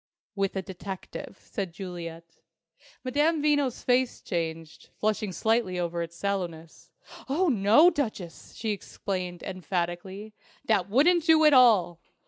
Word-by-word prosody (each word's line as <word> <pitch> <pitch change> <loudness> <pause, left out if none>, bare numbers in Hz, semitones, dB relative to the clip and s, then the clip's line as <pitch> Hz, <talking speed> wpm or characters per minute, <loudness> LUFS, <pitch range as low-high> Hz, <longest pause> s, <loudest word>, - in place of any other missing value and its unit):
"With 195 -1 -1
a 190 - -2
detective," 190 0 -8
said 195 -7 -5
Juliet. 170 -3 -8 0.6
Madame 295 +5 +1
Veno's 290 -4 +1
face 250 0 +1
changed, 165 -3 -5
flushing 215 -1 -1
slightly 220 -1 0
over 170 -1 -2
its 170 0 -6
sallowness. 170 -4 -4 0.4
"Oh, 340 +6 +2
no, 230 - +5
Duchess!" 215 - -5
she 220 -1 -2
exclaimed, 185 -3 -5
emphatically. 185 +2 -4 0.3
"That 200 -4 +1
wouldn't 320 - +4
do 320 -1 +5
at 300 - +7
all. 200 -10 +5
195 Hz, 120 wpm, -27 LUFS, 175-250 Hz, 0.6 s, at